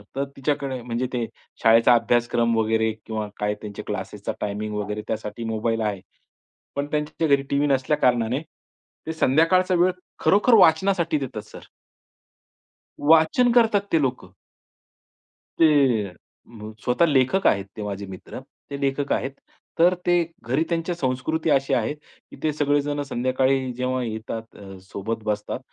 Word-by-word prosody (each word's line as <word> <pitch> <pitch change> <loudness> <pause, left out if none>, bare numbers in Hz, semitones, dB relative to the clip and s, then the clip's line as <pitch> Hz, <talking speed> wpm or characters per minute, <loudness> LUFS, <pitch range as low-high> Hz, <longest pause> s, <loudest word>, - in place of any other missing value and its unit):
तर 140 - 0
तिच्याकडे 135 -2 -2
म्हणजे 120 +1 -2
ते 120 -2 -1 0.4
शाळेचा 115 +2 +6
अभ्यासक्रम 120 0 +1
वगैरे 110 0 +1
किंवा 110 -1 -3
काय 105 0 0
त्यांचे 105 -1 -7
क्लासेसचा 100 0 -4
टायमिंग 105 +1 -3
वगैरे 105 +1 -3
त्यासाठी 110 +1 -4
मोबाईल 115 0 -1
आहे. 105 -3 -2 0.7
पण 140 0 -2
त्यांच्या 150 +2 -1
घरी 140 -1 +3
टीव्ही 140 +1 +1
नसल्या 140 +2 +1
कारणाने 125 0 +1 0.7
ते 160 - -2
संध्याकाळचा 165 +6 +3
वेळ 180 +1 +4 0.3
खरोखर 210 +5 +4
वाचनासाठी 180 -2 +4
देतात 120 -5 -5
सर. - - -13 1.4
वाचन 165 +10 +5
करतात 225 -4 +4
ते 165 - +3
लोकं. 130 -7 -2 1.3
ते 140 -9 +4
अ, 90 - -12 0.7
स्वतः 130 +7 +3
लेखक 145 +6 +2
आहेत, 100 -1 +2
ते 105 - -4
माझे 100 -1 -5
मित्र, 95 -1 -9 0.3
ते 140 - -5
लेखक 140 +1 -1
आहेत. 135 - -1 0.5
तर 175 +2 +6
ते 175 - +3 0.3
घरी 130 +7 +1
त्यांच्या 170 +1 -1
संस्कृती 145 +3 -1
अशी 140 -1 +2
आहे - - +1
की 150 - -19
ते 155 - +2
सगळेजण 145 0 0
संध्याकाळी 130 +1 +1
जेव्हा 130 +1 -1
येतात, 110 0 -4 0.2
अ, 95 -1 -10
सोबत 105 +3 -5
बसतात, 105 +3 -2
130 Hz, 140 wpm, -23 LUFS, 110-150 Hz, 1.4 s, शाळेचा